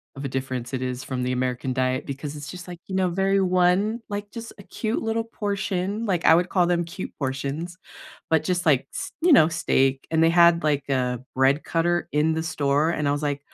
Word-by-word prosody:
of 135 - -6
a - - -2
difference 130 -1 -4
it 130 - -2
is 125 0 -4
from 130 -1 -3
the 125 - -1
American 125 0 -1
diet, 130 0 0
because 140 +1 -6
it's 145 0 -8
just, 180 0 -9
like, 175 -1 -8
you 190 - -7
know, 185 -1 +2
very 195 +2 +1
one 185 +5 +2
like, 205 0 -4
just 230 -1 -8
a - - -10
cute 220 +3 -3
little 225 0 0
portion, 200 -1 -3
like, 180 -5 0
I 160 - +7
would 175 +2 +1
call 180 -2 +2
them 175 -1 +1
cute 180 +3 -7
portions, 140 +6 -3 0.5
but 160 -1 +3
just, 180 +1 -1
like, 140 -5 +3
s - - -5
you 345 -1 +5
know, 155 - +7
steak, 135 -4 +1
and 160 0 +3
they 165 - +5
had, 170 -1 +5
like, 145 -2 0
a 125 -2 0 0.2
bread 135 +3 +3
cutter 175 +1 0
in 150 +2 +2
the 160 0 -2
store, 145 -1 +1
and 150 -3 -1
I - - +2
was 145 +1 -2
like, 145 -1 -1
160 Hz, 225 wpm, -24 LUFS, 135-185 Hz, 0.5 s, I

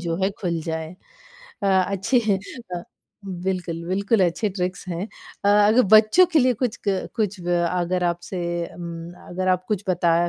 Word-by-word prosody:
जो 170 -1 -2
है 195 - +2
खुल 170 -4 -1
जाए। 160 0 -4 0.7
अ, - - +1
अच्छी 195 +5 +2 0.5
अ, 175 - -4 0.6
बिल्कुल, 175 -3 -2
बिल्कुल 200 +3 +1
अच्छे 175 +5 0
ट्रिक्स 185 0 -3
हैं 175 +4 -3 0.4
अ, - - +4
अगर 210 +4 +5
बच्चों 215 +13 +7
के 315 - +5
लिए 255 -1 +4
कुछ, 240 0 -2
क 190 -1 0
कुछ 205 -3 -1
व 175 0 +1
अगर 180 0 0
आपसे 175 +2 -2 0.4
उम, 170 -1 -7 0.2
अगर 185 +1 -2
आप 185 0 +2
कुछ 210 -2 -1
बताया 175 -1 +2
185 Hz, 165 wpm, -23 LUFS, 175-205 Hz, 0.7 s, बच्चों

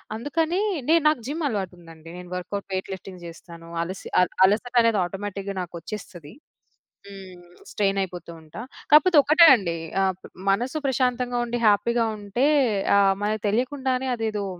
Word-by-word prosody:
అందుకని 325 - -1 0.3
నేను 330 -1 +4
నాకు 305 - 0
జిమ్ 310 +3 -4
అలవాటుందండి. 175 - -7
నేను 180 -1 -10
వర్కౌట్, 195 +2 -5
వెయిట్ 185 - -3
లిఫ్టింగ్ 185 -1 -10
జేస్తాను. 170 0 -12 0.2
అలసి 185 +3 -7
అల 180 - +3 0.2
అలసటనేది 230 +1 +2
ఆటోమేటిక్‌గా 200 +1 -6
నాకొచ్చేస్తది. 175 -2 -9 0.7
హ్మ్. 190 -3 -12 0.3
స్ట్రెయిన్ 195 -1 0
అయిపోతూ 180 -2 -8
ఉంటా. 160 +7 -10 0.3
కాపోతే 315 +2 +6
ఒక్కటే 325 +3 +6
అండి 170 -7 -3 0.3
ఆహ్, 190 -1 0 0.4
మనసు 245 +9 -1
ప్రశాంతంగా 250 -1 0
ఉండి 240 0 -3
హ్యాపీగా 230 +3 +2
ఉంటే 205 +7 0 0.5
ఆహ్, 195 -1 +4
మనకు 215 0 -2
తెలియకుండానే 260 +2 -1
అదేదో 215 -3 -3
205 Hz, 130 wpm, -24 LUFS, 180-250 Hz, 0.7 s, కాపోతే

